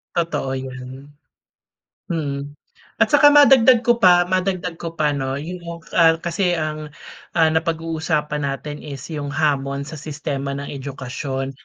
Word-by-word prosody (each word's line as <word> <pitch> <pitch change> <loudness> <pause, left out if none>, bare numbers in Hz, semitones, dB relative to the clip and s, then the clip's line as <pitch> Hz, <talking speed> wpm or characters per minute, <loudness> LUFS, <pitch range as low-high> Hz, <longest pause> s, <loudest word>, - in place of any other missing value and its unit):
Totoo 165 -6 -1
'yan. 130 +2 -8 1.0
Mm. 145 -3 -4 0.5
At 220 - +5
tsaka 290 0 +7
madagdag 260 -4 +7
ko 240 0 +3
pa 175 -2 +6
madagdag 180 -1 -2
ko 165 -1 -6
pa, 150 -2 +1
'no? 135 -1 -2
Yung, 175 +5 -6 0.3
ah, 165 -1 +5
kasi 175 +1 0
ang, 155 -1 -3 0.5
ah, 160 -1 +4
napag-uusapan 160 -2 -1
natin 145 +2 -5
is 140 -3 -8
yung 145 -2 -4
hamon 140 -2 0
sa 150 0 -8
sistema 140 -2 -4
ng 140 0 -6
edukasyon. 135 0 -5
155 Hz, 135 wpm, -21 LUFS, 140-170 Hz, 1.0 s, tsaka